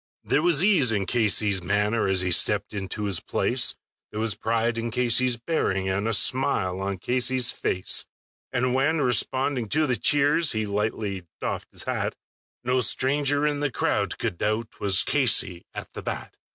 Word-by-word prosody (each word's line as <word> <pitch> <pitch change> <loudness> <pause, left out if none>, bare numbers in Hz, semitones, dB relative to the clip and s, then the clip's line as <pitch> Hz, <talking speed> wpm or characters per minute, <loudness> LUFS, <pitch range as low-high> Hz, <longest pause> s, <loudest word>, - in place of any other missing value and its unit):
There 150 - +1
was 170 -1 +3
ease 175 - +4
in 100 -3 -1
Casey's 105 -4 +2
manner 105 +4 0
as 95 -1 +1
he 90 0 -1
stepped 85 - +2
into 100 +1 -5
his 100 -5 +1
place, - - +1 0.3
There 105 - -6
was 110 -1 +1
pride 115 +1 -1
in 115 +1 -3
Casey's 125 +1 +1
bearing, 105 - -1
and 100 +3 -1
a 115 - 0
smile 115 -8 +1
on 100 0 -3
Casey's 125 +4 +2
face; 90 - 0 0.5
And 125 +1 0
when, 150 +4 +1
responding 130 -1 0
to 155 +5 +2
the 125 -3 0
cheers, 145 +6 +3
he 110 -1 -1
lightly 105 -2 -3
doffed - - -4
his - - -4
hat, - - -3 0.5
No 125 +1 +1
stranger 145 +4 +1
in 145 -1 0
the 145 0 0
crowd - - -1
could 85 - -4
doubt 110 +1 -2
'twas 100 -1 +1
Casey 110 -10 +1
at - - -9
the - - -7
bat. - - -6
115 Hz, 170 wpm, -24 LUFS, 100-130 Hz, 0.5 s, ease